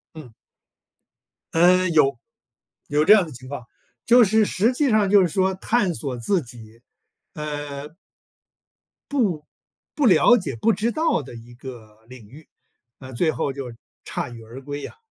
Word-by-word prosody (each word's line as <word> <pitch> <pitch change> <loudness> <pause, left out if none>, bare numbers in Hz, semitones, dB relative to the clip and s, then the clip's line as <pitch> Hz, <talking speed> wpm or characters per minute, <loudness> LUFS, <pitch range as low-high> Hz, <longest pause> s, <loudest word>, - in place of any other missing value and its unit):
嗯。 130 -7 -11 1.2
嗯， 180 +2 +4
有 140 -4 +3 0.7
有 150 +1 +1
这 205 - +8
样 205 -4 +4
的 160 - -11
情 130 +1 -11
况， 140 -3 -7 0.4
就 240 +1 +6
是 220 +1 +3
实 220 +6 +1
际 280 +2 +1
上 215 -3 +2
就 200 0 +6
是 180 - +3
说 190 +2 0
探 200 -1 0
索 135 -5 -5
自 175 - 0
己， 115 -3 -14 0.5
呃， 145 -1 -6
不 - - -27 2.0
不 295 -4 +2
了 210 +5 +6
解 150 - -4
不 225 - +2
知 215 +4 -1
道 320 - 0
的 130 -2 -11
一 120 +1 -13
个 115 -4 -12
领 125 -5 -13
域， 145 +7 -16 0.5
啊， 130 0 -11
最 160 +7 +1
后 150 -3 -2
就 135 -3 -7 0.3
铩 120 - -5
羽 115 - -11
而 120 +4 -11
归 145 +1 -6
啊。 - - -14
150 Hz, 170 characters per minute, -22 LUFS, 125-195 Hz, 2.0 s, 这